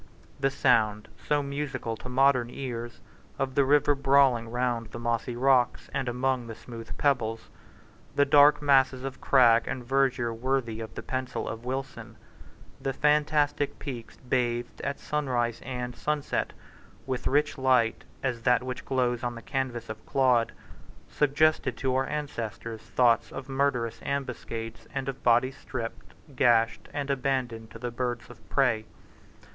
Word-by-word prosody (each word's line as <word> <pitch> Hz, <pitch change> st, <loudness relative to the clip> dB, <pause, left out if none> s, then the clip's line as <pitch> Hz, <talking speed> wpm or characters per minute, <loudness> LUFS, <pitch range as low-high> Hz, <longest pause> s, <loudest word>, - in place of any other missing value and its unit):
The 135 Hz, 0 st, +2 dB
sound, 110 Hz, -6 st, +2 dB, 0.2 s
so 145 Hz, -1 st, +2 dB
musical 140 Hz, -5 st, -3 dB
to 125 Hz, -, -9 dB
modern 130 Hz, -1 st, +3 dB
ears, 120 Hz, -3 st, -6 dB, 0.4 s
of 135 Hz, -1 st, -1 dB
the 140 Hz, -, +4 dB
river 145 Hz, +1 st, +4 dB
brawling 135 Hz, -4 st, +3 dB
round 120 Hz, -1 st, -1 dB
the 110 Hz, -, -9 dB
mossy 120 Hz, +1 st, -1 dB
rocks 125 Hz, -1 st, +2 dB
and 135 Hz, -2 st, -1 dB
among 125 Hz, 0 st, 0 dB
the 115 Hz, -, -7 dB
smooth 115 Hz, 0 st, -9 dB
pebbles, 115 Hz, -6 st, 0 dB, 0.7 s
the 145 Hz, -, +4 dB
dark 145 Hz, +1 st, +6 dB
masses 135 Hz, -2 st, +4 dB
of 135 Hz, -1 st, -6 dB
crag 120 Hz, -4 st, +5 dB
and 125 Hz, -2 st, -4 dB
verdure 130 Hz, -3 st, +1 dB
worthy 120 Hz, -1 st, -1 dB
of 110 Hz, -5 st, -7 dB
the -, -, -6 dB
pencil 130 Hz, -1 st, -3 dB
of 115 Hz, +1 st, -6 dB
Wilson, 130 Hz, +1 st, -5 dB, 0.7 s
the 135 Hz, -, -1 dB
fantastic 150 Hz, 0 st, +2 dB
peaks 120 Hz, -6 st, -7 dB
bathed, 120 Hz, -1 st, -1 dB
at 140 Hz, 0 st, -3 dB
sunrise 125 Hz, -6 st, -1 dB
and 125 Hz, -1 st, -4 dB
sunset, 150 Hz, -1 st, -1 dB, 0.5 s
with 130 Hz, -2 st, -2 dB, 0.3 s
light 130 Hz, -4 st, +3 dB
rich -, -, -19 dB, 0.2 s
as 125 Hz, -3 st, -1 dB
that 125 Hz, +1 st, +3 dB
which 130 Hz, +1 st, -5 dB
glows 125 Hz, -2 st, 0 dB
on 120 Hz, -1 st, -2 dB
the 115 Hz, -, -8 dB
canvass 125 Hz, +2 st, -3 dB
of 110 Hz, 0 st, -8 dB
Claude, 125 Hz, -4 st, +3 dB, 0.6 s
suggested 150 Hz, +2 st, +2 dB
to 130 Hz, -2 st, 0 dB
our 130 Hz, +1 st, +1 dB
ancestors 115 Hz, -6 st, -4 dB
thoughts 115 Hz, 0 st, +2 dB
of 135 Hz, -, -7 dB
murderous 135 Hz, -4 st, 0 dB
ambuscades 120 Hz, -4 st, -4 dB
and 135 Hz, -1 st, -2 dB
of 135 Hz, -1 st, -4 dB
bodies 125 Hz, +3 st, +3 dB
stripped, 115 Hz, -5 st, -6 dB, 0.2 s
gashed, 115 Hz, -3 st, +3 dB
and 145 Hz, -1 st, -2 dB
abandoned 130 Hz, -5 st, -1 dB
to -, -, -10 dB
the 120 Hz, +1 st, -4 dB
birds 120 Hz, 0 st, -3 dB
of 110 Hz, -2 st, -17 dB
prey. 120 Hz, -6 st, +2 dB
125 Hz, 150 wpm, -28 LUFS, 115-135 Hz, 0.7 s, dark